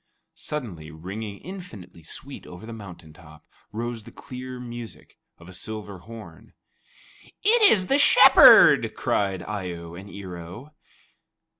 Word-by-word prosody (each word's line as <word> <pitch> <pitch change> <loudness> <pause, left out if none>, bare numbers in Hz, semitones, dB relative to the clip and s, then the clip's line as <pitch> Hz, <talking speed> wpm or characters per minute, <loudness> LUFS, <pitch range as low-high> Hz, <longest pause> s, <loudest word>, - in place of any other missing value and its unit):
Suddenly, 115 - -7
ringing 100 +6 -8
infinitely 110 - -11
sweet 135 - -9
over 90 +4 -11
the 115 - -9
mountain 90 -7 -12
top, 80 -1 -17 0.3
rose 115 +1 -5
the - - -13
clear 125 0 -9
music 120 -2 -10 0.2
of 85 - -16
a 95 - -12
silver 105 -1 -7
horn. 110 +4 -13 0.9
"It 450 +3 +4
is 185 -3 +2
the 275 +8 +2
Shepherd!" - - +7
cried 95 -2 -1
Eye 95 -4 -5
o 85 0 -10
and 95 +4 -11
Ear 95 -3 -9
o. 90 - -11
105 Hz, 135 wpm, -24 LUFS, 90-120 Hz, 0.9 s, Shepherd